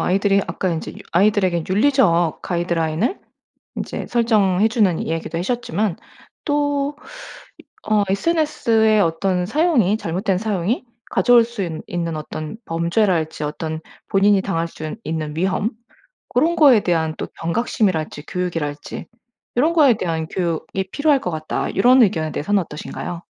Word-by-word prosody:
아이들이 200 +1 +2
아까 185 - -2
인제 160 -1 -4
유 - - -13 0.2
아이들에게 185 -2 +2
윤리적 190 - +2
가이드라인을 170 - -1 0.6
인제 - - -5
설정해 215 -4 +2
주는 205 -8 +2
이야기도 165 0 -3
해셨지만 210 -1 -1 0.5
또 290 -1 0 0.6
이 - - -15 0.2
어 210 -1 +3
"SNS의 225 - +2
어떤 180 +1 0
사용이 270 - +2
잘못된 185 +1 -1
사용이 210 +2 -1 0.3
가져올 240 -2 +5
수 235 -3 -6
있 170 - -3 0.2
있는 170 -2 -3
어떤 155 +5 -6
범죄랄지 170 -2 0
어떤 160 +1 -4 0.3
본인이 195 0 +4
당할 170 -4 -1
순 155 +5 -7
있는 155 -2 -3
위험 190 +5 0 0.6
고런 335 +2 +2
거에 270 -9 +7
대한 160 -3 0
또 - - -4
경각심이랄지 170 -5 -1
교육이랄지 165 -5 -4 0.5
요런 310 +6 +4
거에 290 -7 +6
대한 160 -4 -2
교육이 180 +2 -3
필요할 290 -2 +2
것 180 - -3
같다." 155 0 -3
요런 250 +5 +6
의견에 160 -6 0
대해서는 200 +5 +1
어떠신가요? 165 +2 -6
190 Hz, 330 characters per minute, -20 LUFS, 165-225 Hz, 0.6 s, 거에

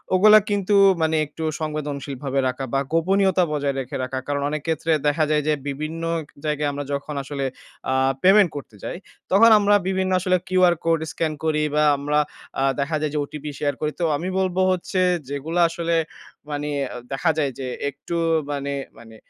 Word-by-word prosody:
ওগুলা 215 +3 +8
কিন্তু 205 0 +1 0.3
মানে 160 0 +2
একটু 160 +2 -8 0.2
সংবেদনশীলভাবে 140 -3 -3
রাখা 130 +1 -3
বা 135 - +3
গোপনীয়তা 190 +2 +3
বজায় 145 -2 -1
রেখে 130 -1 -5
রাখা। 130 +1 -3
কারণ, 145 0 -1
অনেক 150 0 -3
ক্ষেত্রে 160 0 0 0.2
দেখা 150 +2 +2
যায় 150 -1 +2
যে 155 - +3
বিভিন্ন 155 +4 -4 0.4
জায়গায় 150 -1 0
আমরা 145 0 -4
যখন 140 +2 -4
আসলে 140 0 -4 0.5
আ - - +2 0.3
পেমেন্ট 195 0 +6
করতে 140 -6 -8
যাই - - -4 0.3
তখন 215 +5 +7
আমরা 205 0 +4
বিভিন্ন 190 0 0
আসলে 185 0 +2
কিউআর 185 -2 +4
কোড 165 -1 +3
স্ক্যান 160 -2 -1
করি 150 -1 +1
বা 150 - +4
আমরা 145 +2 0 0.4
আ - - +2 0.2
দেখা 145 +3 -1
যায় 155 -1 -1
যে - - -1
ওটিপি 150 +1 -7
শেয়ার 145 -1 0
করি। 150 - 0
তো - - -1
আমি 175 - -4
বলবো 185 -1 0
হচ্ছে 185 +1 -2 0.3
যেগুলা 155 +5 -1
আসলে 170 0 -1 0.6
মানে 145 0 -3 0.4
দেখা 150 +5 +1
যায় 145 -3 +1
যে 130 - -4 0.2
একটু 145 +5 -7 0.4
মানে 140 0 -3 0.2
মানে 115 -1 -14
155 Hz, 175 wpm, -23 LUFS, 140-175 Hz, 0.6 s, ওগুলা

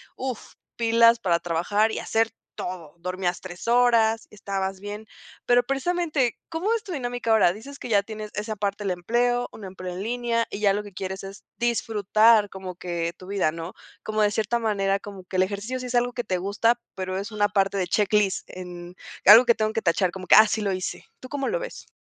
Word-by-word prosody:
uf, 255 -4 -5 0.2
pilas 230 0 +5
para 170 -3 +1
trabajar 190 +6 +1
y - - -4
hacer 225 0 +1 0.2
todo, 170 -4 -6
dormías 180 0 -2
3 185 +4 -9
horas, 235 -2 +3
estabas 195 -2 -4
bien. 205 +2 -7 0.4
Pero 245 0 +5
precisamente, 275 -1 0
¿cómo 345 +7 -1
es 455 - -4
tu 400 - -8
dinámica 245 -6 -2
ahora?, 215 -5 +5
dices 275 +7 -11
que - - -7
ya 200 -3 +3
tienes 215 0 -7
esa 215 +1 -3
parte 205 0 -2
del 195 - -1
empleo, 240 +7 0
una 210 - -10
empleo 185 -1 -7
en 190 - -4
línea 235 0 0
y 200 - -5
ya 200 -2 +3
lo 210 - -2
que 205 -2 -12
quieres 190 +1 -5
es 195 +1 -9
disfrutar 220 -2 +3
como 190 -1 -7
que 170 -1 -3
tu 185 - -12
vida, 195 -6 +1
¿no?, 165 +2 -7 0.3
como 215 0 -1
de 210 - +4
cierta 220 +3 0
manera. 200 -3 0
Como 200 -3 -10
que 185 +1 -5
el 185 - +5
ejercicio 205 +6 -4
sí 250 - -5
es 245 - -3
algo 245 0 +2
que 245 - -3
te 185 -2 -1
gusta, 210 +6 +1 0.2
pero 185 0 -3
es 200 +4 -5
una 210 -1 +2
parte 195 -1 +1
de 180 - -1
checklist 205 0 +1
en 175 -1 -9 0.3
algo 225 +5 +10
que 235 -1 +4
tengo 215 0 -1
que 225 - -1
tachar, 175 +1 +2
como 185 -1 -8
que: - - +8
"Ah, 220 - +9
sí 215 +1 -1
lo 200 -2 0
hice", 185 -1 -4
¿tú 255 - -10
cómo 275 -1 -2
lo - - 0
ves? - - -8
210 Hz, 215 wpm, -25 LUFS, 190-235 Hz, 0.4 s, algo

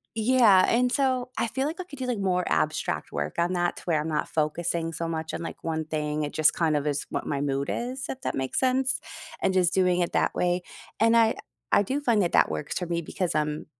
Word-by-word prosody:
yeah, 220 -4 +5
and, 250 +1 +2
so, 255 -2 +1
I - - +1
feel 265 +5 -1
like 320 +4 -5
I - - -2
could 285 -6 -11
do 260 - -2
like 245 -2 -1
more 180 -2 +1
abstract 155 0 -1
work 75 +1 -3
on 175 +2 +1
that 175 -1 0
to - - -10
where 160 -4 +1
I'm 155 - -4
not 150 -1 -1
focusing 165 +2 -1
so 165 +1 -3
much 160 -1 -4
on, - - -5
like, 165 - -7
one 160 -1 -2
thing. 150 -1 -2
It 145 - -4
just 155 -1 +4
kind 160 -3 +1
of 145 - -3
is 145 0 -1
what - - -3
my 140 -1 -1
mood 140 -1 -1
is, 250 +1 -4
if 265 - -5
that - - -2
makes 130 -1 -1
sense, 260 0 +1 0.4
and 190 - +2
just 180 -2 +3
doing 180 -1 +3
it 175 - 0
that - - +1
way 180 0 +1 0.4
and 230 +1 +4
I 225 -1 +4 0.4
I 205 - +5
do 270 +8 -2
find 235 -6 +2
that 175 - 0
that - - +5
works 80 -1 -3
for 180 - -4
me 170 0 -1
because, 180 +2 -3
um, 150 0 -1
175 Hz, 250 wpm, -26 LUFS, 155-235 Hz, 0.4 s, yeah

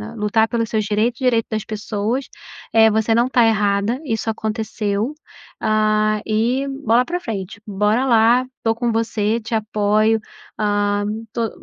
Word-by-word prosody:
lutar 220 +1 +2
pelos 230 -1 -2
seus 215 -2 0
direitos, 215 +3 0
direito 245 -4 +1
das 215 -1 -2
pessoas, 215 +4 -3 0.5
eh, 220 0 +6
você 220 +1 +1
não 235 +1 +3
está 250 -2 +3
errada, 210 +2 +1
isso 225 -3 -2
aconteceu, 220 +1 -2 0.5
ah, 215 -1 +1
e 235 +5 0 0.2
bola 230 +3 +4
pra 350 +7 -3
frente, 205 - -6
bora 210 +5 +1
lá, 235 +1 +4
estou 225 0 0
com 240 0 -1
você 225 -1 0
te 225 +1 -4
apoio", 215 0 +1 0.4
hã 205 -1 +1 0.3
to 230 -2 -1
220 Hz, 145 wpm, -20 LUFS, 210-230 Hz, 0.5 s, eh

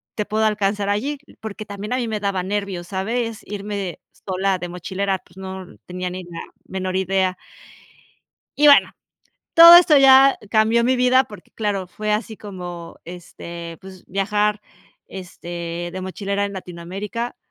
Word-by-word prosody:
te 210 - -2
puedo 220 +1 0
alcanzar 205 -1 0
allí" 270 +9 -1 0.2
porque 215 -1 -7
también 205 +3 -5
a - - +1
mí 245 -2 -2
me 215 -1 -2
daba 200 -2 -1
nervios, 195 -2 -3
¿sabes?, 225 +4 -2
irme 200 -3 -5 0.3
sola 190 0 0
de 175 - -4
mochilera, 190 +2 -3
pues 175 - -24
no 190 0 -7 0.2
tenía 180 0 -4
ni 185 0 -6
la 170 -1 -8 0.2
menor 185 -1 -4
idea. 190 -1 0 1.2
Y 295 - +5
bueno, 285 -1 +7 0.6
todo 335 0 +11
esto 345 -4 +6
ya 270 0 +7
cambió 220 +1 +3
mi 255 +2 +2
vida 250 +1 +4
porque 205 -4 -14
claro, 205 -4 -2
fue 210 +3 -3
así 220 0 -2
como, 175 -4 -8
este, 170 -1 -9
pues 190 -1 -13
viajar, 210 +2 0 0.5
este, 175 -2 -6
de 185 - -5
mochilera 200 +2 -2
en 200 - -4
Latinoamérica 190 +6 -6
200 Hz, 150 wpm, -21 LUFS, 185-215 Hz, 1.2 s, todo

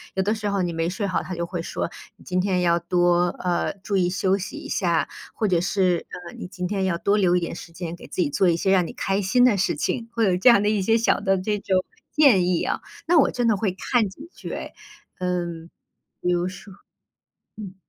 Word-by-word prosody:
有 190 - +1
的 210 +3 +1
时 210 -1 -3
候 200 -1 0
你 175 -1 -1
没 165 +1 -1
睡 200 +3 -2
好， 185 - -1
它 185 - -6
就 170 -1 -2
会 175 -1 -4
说 170 - -3 0.3
你 - - -18
今 180 0 -1
天 185 -1 +1
要 170 -1 +3
多 175 0 +2
呃， 175 -1 0
注 200 0 -2
意 180 -2 +2
休 190 +1 +1
息 195 - -6
一 - - -8
下， 170 -4 +1 0.3
或 215 - 0
者 180 -3 +2
是， 185 -2 +1 0.2
呃， - - -12
你 - - -6
今 180 0 -5
天 195 0 -1
要 185 -3 0
多 200 +3 +2
留 180 -3 +3
一 - - +3
点 170 -1 -4
时 170 - -10
间 170 0 -6
给 - - -13
自 - - -3
己 155 - +1
做 180 +5 +2
一 170 - +3
些 190 - 0
让 185 -2 +4
你 - - -6
开 195 +1 -1
心 205 +6 +3
的 245 -4 +4
事 195 - +1
情， 230 -1 -2
会 230 -1 +1
有 185 -3 +3
这 190 +7 +6
样 235 -4 +6
的 205 - 0
一 210 -2 +1
些 225 +4 +3
小 230 - +2
的 195 -1 +2
这 210 +2 -1
种 195 -2 0 0.3
建 260 -12 +5
议 180 -1 +1
啊， - - -2 0.3
那 345 +1 +4
我 285 - +5
真 245 -2 0
的 225 - +4
会 200 -1 0
看 220 +4 0
几 290 - -12
句 - - -8
哎。 - - -6 0.5
嗯， 175 -2 -3 0.5
比 180 - 0
如 175 0 +1
说 185 +2 -11 0.8
嗯。 200 -3 -8
185 Hz, 265 characters per minute, -24 LUFS, 175-205 Hz, 0.8 s, 这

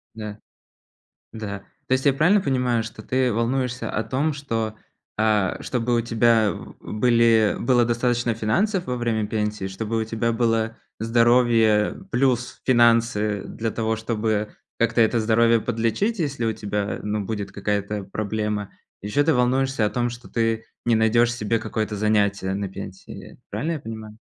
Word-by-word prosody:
Да. 105 -1 -6 1.0
Да. 105 -3 -5 0.3
То - - -3
есть 130 +2 +1
я 140 - +6
правильно 175 +9 +4
понимаю, 125 -6 +1
что 110 -1 -9
ты 130 0 +1
волнуешься 120 +1 -1
о 110 - -1
том, 135 +8 0
что, 115 -6 -3 0.4
а, 105 -3 +2
чтобы 120 -1 -1
у - - +3
тебя, 115 -1 +3
м, - - -7
были 115 -1 +3
было 120 -1 +3
достаточно 120 0 0
финансов 180 - 0
во 125 - -2
время 115 -3 -1
пенсии, 105 -2 -2
чтобы 110 +4 -3
у - - -1
тебя 115 +1 -1
было 115 -1 0 0.2
здоровье 115 -2 +3
плюс 125 -1 0
финансы 115 -4 +3
для 115 0 -3
того, 110 0 -1
чтобы 110 -1 -2 0.2
как-то 115 0 +2
это 115 +1 +3
здоровье 115 +1 +3
подлечить, 120 - -1
если 140 -7 -2
у 115 - +1
тебя, 105 0 -3
ну, 105 -1 -2
будет 105 -1 -4
какая-то 100 0 -2
проблема. 105 0 -3 0.3
Еще 105 +8 +1
ты 160 - +3
волнуешься 130 -1 +2
о - - -1
том, 120 -1 0
что 120 +1 -10
ты 115 -1 0 0.2
не 120 - +3
найдешь 115 +2 +3
себе 115 0 0
какое-то 110 -1 -3
занятие 100 -2 +1
на 100 0 -3
пенсии. 95 0 -10
Правильно 165 +3 -2
я 155 - -4
понимаю? 110 -1 -8
115 Hz, 155 wpm, -23 LUFS, 105-120 Hz, 1.0 s, я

